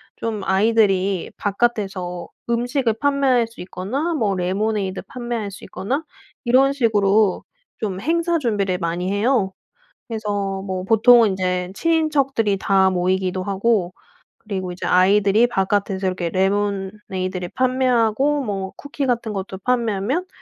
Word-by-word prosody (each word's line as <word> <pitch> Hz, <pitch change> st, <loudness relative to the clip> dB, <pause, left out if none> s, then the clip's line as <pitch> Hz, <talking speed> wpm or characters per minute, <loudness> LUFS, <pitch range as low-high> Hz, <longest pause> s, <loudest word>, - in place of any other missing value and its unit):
좀 220 Hz, -3 st, -3 dB
아이들이 195 Hz, -2 st, +2 dB
바깥에서 195 Hz, -5 st, -1 dB, 0.2 s
음식을 240 Hz, 0 st, +1 dB
판매할 275 Hz, -4 st, +2 dB
수 230 Hz, -5 st, -12 dB
있거나 235 Hz, -, -3 dB
뭐 215 Hz, -10 st, 0 dB
레모네이드 195 Hz, +1 st, -1 dB
판매할 240 Hz, -4 st, -4 dB
수 195 Hz, -, -12 dB
있거나 270 Hz, +11 st, -3 dB, 0.4 s
이런 260 Hz, +3 st, +4 dB
식으로 210 Hz, -5 st, +2 dB, 0.3 s
좀 195 Hz, -4 st, -3 dB
행사 335 Hz, -, +1 dB
준비를 205 Hz, -, 0 dB
많이 175 Hz, +3 st, -2 dB
해요. 205 Hz, -2 st, +1 dB, 0.5 s
그래서 205 Hz, -4 st, -3 dB
뭐 185 Hz, -1 st, -4 dB
보통은 225 Hz, +1 st, +6 dB
인제 180 Hz, -1 st, -2 dB
친인척들이 275 Hz, -9 st, +1 dB
다 190 Hz, -1 st, +3 dB
모이기도 185 Hz, +1 st, 0 dB
하고 195 Hz, -1 st, 0 dB, 0.5 s
그리고 190 Hz, -4 st, -4 dB
이제 175 Hz, -, -8 dB
아이들이 200 Hz, +4 st, +4 dB
바깥에서 195 Hz, -2 st, 0 dB
이렇게 185 Hz, -2 st, -1 dB
레모네이드를 190 Hz, -1 st, -2 dB
판매하고 255 Hz, +2 st, +2 dB
뭐 195 Hz, -5 st, -4 dB
쿠키 285 Hz, -1 st, -4 dB
같은 235 Hz, -3 st, -1 dB
것도 190 Hz, -1 st, -5 dB
판매하면 240 Hz, -, 0 dB
205 Hz, 310 characters per minute, -21 LUFS, 190-240 Hz, 0.5 s, 보통은